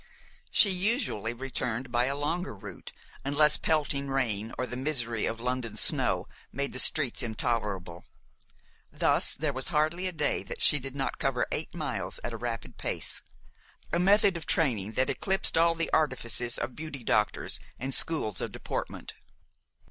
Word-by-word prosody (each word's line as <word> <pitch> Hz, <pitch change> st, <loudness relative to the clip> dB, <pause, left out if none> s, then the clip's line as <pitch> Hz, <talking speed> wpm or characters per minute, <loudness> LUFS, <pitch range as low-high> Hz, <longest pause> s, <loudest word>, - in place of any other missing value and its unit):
She 200 Hz, -, +5 dB
usually 185 Hz, -, +1 dB
returned 125 Hz, 0 st, -3 dB
by 120 Hz, 0 st, +2 dB
a 135 Hz, +2 st, -1 dB
longer 155 Hz, 0 st, -2 dB
route, 95 Hz, -, -10 dB, 0.3 s
unless 145 Hz, +2 st, +3 dB
pelting 145 Hz, -3 st, 0 dB
rain 115 Hz, -6 st, -1 dB
or 130 Hz, -, 0 dB
the 125 Hz, -, -6 dB
misery 125 Hz, -5 st, -1 dB
of 115 Hz, -, -3 dB
London 120 Hz, -3 st, -2 dB
snow -, -, +3 dB, 0.2 s
made 140 Hz, 0 st, -2 dB
the 130 Hz, -, -3 dB
streets 140 Hz, -5 st, +4 dB
intolerable. 105 Hz, -7 st, -2 dB, 0.9 s
Thus -, -, +3 dB
there 150 Hz, -1 st, -1 dB
was 130 Hz, 0 st, -3 dB
hardly 170 Hz, +3 st, +1 dB
a -, -, -2 dB
day 150 Hz, -4 st, 0 dB
that -, -, -7 dB
she 150 Hz, -, +7 dB
did 135 Hz, 0 st, -7 dB
not 135 Hz, -1 st, -2 dB
cover -, -, +1 dB
eight -, -, -3 dB
miles -, -, -3 dB
at 120 Hz, -, -4 dB
a -, -, -4 dB
rapid 115 Hz, -1 st, -5 dB
pace, -, -, -2 dB, 0.7 s
a 170 Hz, -, +3 dB
method 195 Hz, 0 st, +4 dB
of 160 Hz, -, -8 dB
training 110 Hz, -, +1 dB
that 130 Hz, +2 st, +2 dB
eclipsed 190 Hz, 0 st, +1 dB
all 165 Hz, 0 st, +4 dB
the 165 Hz, -, -2 dB
artifices 120 Hz, -5 st, 0 dB
of 125 Hz, -, -4 dB
beauty 150 Hz, -5 st, -7 dB
doctors 105 Hz, -1 st, +1 dB, 0.2 s
and 130 Hz, +2 st, -3 dB
schools 120 Hz, -, 0 dB
of -, -, -3 dB
deportment. -, -, -5 dB
135 Hz, 160 wpm, -29 LUFS, 115-155 Hz, 0.9 s, she